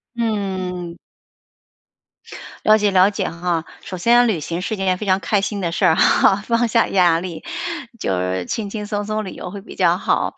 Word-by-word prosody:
嗯。 185 -6 -3 1.7
了 215 0 +5
解， 205 -1 +2
了 190 +1 +5
解 205 - -2
哈， 170 -1 -2 0.2
首 185 - -7
先 240 +6 +4
旅 200 - 0
行 170 +4 -4
是 220 - -2
件 190 -2 0
非 210 - -6
常 190 0 +3
开 205 0 +1
心 200 +1 -3
的 170 -3 -2
事 185 - -1
儿 160 -2 +5
哈， 195 - +4
放 235 0 +2
下 230 +1 +3
压 175 -4 +3
力， 175 -2 -7 0.6
就 95 - -1
是 90 0 -2
轻 210 -3 -3
轻 210 -1 -5
松 205 -1 -3
松 215 0 -2
旅 190 - -6
游 180 - -7
会 200 +1 -7
比 200 - -12
较 175 -1 +3
好。 - - -1
190 Hz, 210 characters per minute, -20 LUFS, 175-210 Hz, 1.7 s, 了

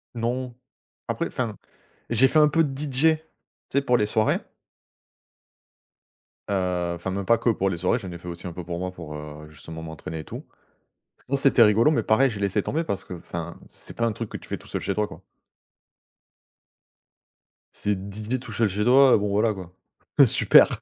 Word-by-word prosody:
Non. 120 +2 -2 0.5
Après - - -1
enfin, 115 -5 -3 0.6
j'ai 120 +3 +5
fait 155 - +2
un 150 -1 +7
peu 165 +3 +3
de 140 - -3
DJ. 150 +2 +3 0.5
Tu - - +2
sais, - - +1
pour 125 -3 +3
les 105 - +1
soirées. 110 +1 +2 2.1
Heu 90 -3 0
enfin 85 +2 -4
même 100 0 -3
pas 115 +3 +4
que 120 - +1
pour 95 -3 +1
les 90 - -3
soirées, 90 +8 +1
j'en 95 -5 -7
ai 85 - -7
fait 85 - -12
aussi 85 +1 -6
un 85 - -6
peu 90 - -6
pour 85 0 -5
moi 90 0 -3
pour, 80 -4 -9
heu, 75 0 -9
justement 80 +1 -10
m'entraîner 80 0 -7
et - - -6
tout. - - -8 0.8
Sinon 140 - 0
c'était 135 -3 +5
rigolo 110 +5 +5
mais 155 - +1
pareil, 130 +5 +3
j'ai 105 -3 -6
laissé 100 +1 +1
tomber 160 +9 -1
parce 100 -11 -3
qu'enfin 85 -1 -7
c'est - - -8
pas 115 - +1
un 115 - 0
truc 115 +1 -5
que - - -5
tu - - -12
fais - - -3
tout - - -15
seul - - -3
chez - - -2
toi, 105 0 0
quoi. - - -13 2.5
C'est 105 0 -1
DJ 105 +6 -4
tout 120 - -10
seul 110 +1 +2
chez 100 +2 -1
toi, 130 +3 +6
heu, - - +6
bon 105 0 -1
voilà 105 +2 +2
quoi. 90 -3 -10 0.5
Heu, - - +10
super. - - +5
105 Hz, 200 wpm, -25 LUFS, 90-125 Hz, 2.5 s, Heu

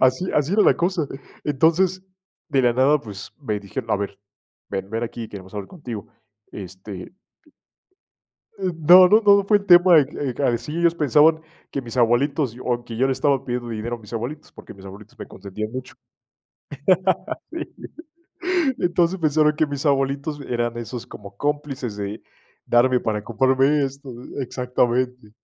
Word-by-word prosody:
Así 130 +8 +3
así 150 +3 +1
era 210 +1 +4
la - - +4
cosa. 175 -3 0 0.4
Entonces, 165 +6 +2 0.5
de 135 - +2
la 120 -1 +4
nada, 140 +4 +3
pues 105 -5 -9
me 110 -7 -2
dijeron: 100 - -6
“A - - +3
ver, 100 0 -5 0.5
ven, 95 0 -4
ven 115 +1 -2
aquí, 115 0 -6
queremos 95 -1 -11
hablar 100 -2 -5
contigo”. 120 - -8 0.4
Este 95 - -9 1.5
eh, 185 - -1
no, 175 +4 +8
no, 215 +4 +6
no 200 -1 +6
fue 205 +1 +4
el 200 - -13
tema, 175 -1 +7
de 145 -3 +5
que 135 -2 -4
que 145 - -4
así, 135 +5 -1
ellos 170 0 +3
pensaban 155 +1 +4 0.3
que 140 - -3
mis 120 0 -8
abuelitos 125 +2 +2
o, 120 -1 -2
que 115 -2 -8
yo 130 +3 +2
le 135 - +1
estaba 135 0 +1
pidiendo 120 -1 -3
dinero 115 +1 -4
a - - -16
mis 110 -1 -15
abuelitos, 120 +7 -5
porque - - -12
mis 95 -1 -15
abuelitos 100 +2 -12
me - - -7
consentían 100 +3 -7
mucho. 130 0 -7 1.6
Sí 335 0 -4 1.1
Entonces, 175 +1 +1
pensaron 155 -1 +3
que 155 0 +2
mis 145 +1 -5
abuelitos 140 +1 0
eran 120 -1 -2
esos 120 +1 -6
como 100 -1 -11
cómplices 145 -6 -3
de 100 +1 -5 0.4
darme 125 +1 +3
para 105 -3 -2
comprarme 135 +5 +2
esto 135 0 -8 0.3
Exactamente. 125 -2 -1
130 Hz, 165 wpm, -22 LUFS, 115-150 Hz, 1.6 s, no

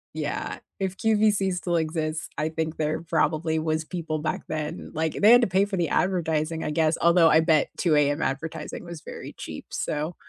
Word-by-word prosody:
Yeah, - - -3 0.2
if 190 -1 -2
QVC 210 -3 +2
still 175 -1 -1
exists, 155 -1 -2
I 155 +1 0
think 160 0 -3
there 155 +1 -1
probably 160 -1 0
was 155 0 -1
people 160 -3 -3
back 155 - -2
then, 155 +2 -4
like, 160 0 -1
they 210 +3 +5
had 245 +1 +8
to 235 - +3
pay 190 +2 +3
for 200 -2 -2
the 170 -2 +1
advertising, 160 -3 0
I 150 - -1
guess, 160 +1 +2
although 170 -1 +6
I 155 - +6
bet 160 -2 +3
2:00 160 -4 +2
AM 145 +1 +2
advertising 140 +5 -4
was 170 -2 -8
very - - -9
cheap. - - -8
So 155 +3 -3
160 Hz, 190 wpm, -25 LUFS, 155-180 Hz, 0.2 s, had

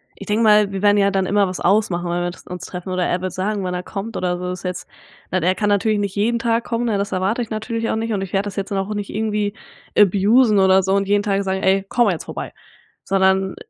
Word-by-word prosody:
ich - - -11
denke 215 +2 +1
mal, 210 -2 +5
wir 195 0 -4
werden 205 0 +4
ja 200 0 +3
dann 190 0 0
immer 200 0 +2
was 185 - -5
ausmachen, 180 -3 +1
weil 175 0 -1
wir 175 - -2
das - - -16
uns 180 0 -7
treffen 180 +1 -7
oder 185 -1 0
er 180 - -1
wird 185 -1 -4
sagen, 200 +2 -2
wann 180 -1 -2
er 180 0 -3
kommt 210 +3 -6
oder 180 -1 -1
so, 180 0 -4
ist 180 -1 -7
ja 180 - -1
jetzt 180 - -7 0.4
weil, 185 -2 0
er 185 +1 +2
kann 205 -1 0
natürlich 205 +1 +2
nicht 200 -2 -3
jeden 230 +3 +1
Tag 230 0 0
kommen, 235 +1 -2
ne, 215 -3 0
das 200 0 -2
erwarte 195 +6 0
ich 230 - -5
natürlich 225 +1 -3
auch - - 0
nicht 225 0 -2
und 195 - -1
ich 195 0 -6
werde 195 +1 0
das 200 - -6
jetzt 195 +1 -3
dann 195 - -1
auch 195 +2 -2
nicht 205 -1 -4
irgendwie 210 -1 -1 0.4
abusen 210 +3 +4
oder 190 0 +5
so 190 +1 0
und 200 0 +1
jeden 205 0 +2
Tag 200 -1 0
sagen: 190 0 -2
„Ey 195 +1 +2
komm 240 -4 +3
jetzt 170 -5 -3
vorbei." - - -6 0.5
sondern 190 0 +2
200 Hz, 275 wpm, -20 LUFS, 185-210 Hz, 0.5 s, mal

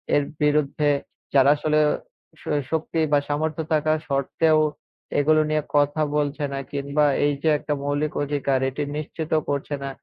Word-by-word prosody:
এর 145 - +3 0.2
বিরুদ্ধে 150 0 +2 0.4
যারা 135 0 +6
আসলেও 150 0 +2 0.5
শ - - -16 0.3
শক্তি 160 +1 -1
বা 145 - +6
সামর্থ্য 155 +2 -1
থাকা 155 0 +2
শর্তেও 155 +3 +2 0.6
এগুলো 155 +2 +4
নিয়ে 155 -1 +1
কথা 145 +2 +2 0.2
বলছে 145 0 -1
না 135 - -2
কিংবা 140 +1 0 0.2
এই 145 - +2
যে 160 - +3
একটা 150 - -3
মৌলিক 145 +1 -1
অধিকার 140 -2 0
এটি 135 +3 -4
নিশ্চিত 155 +1 -5 0.2
করছে 145 +1 -2
না 140 - -3
150 Hz, 150 wpm, -23 LUFS, 145-155 Hz, 0.6 s, যারা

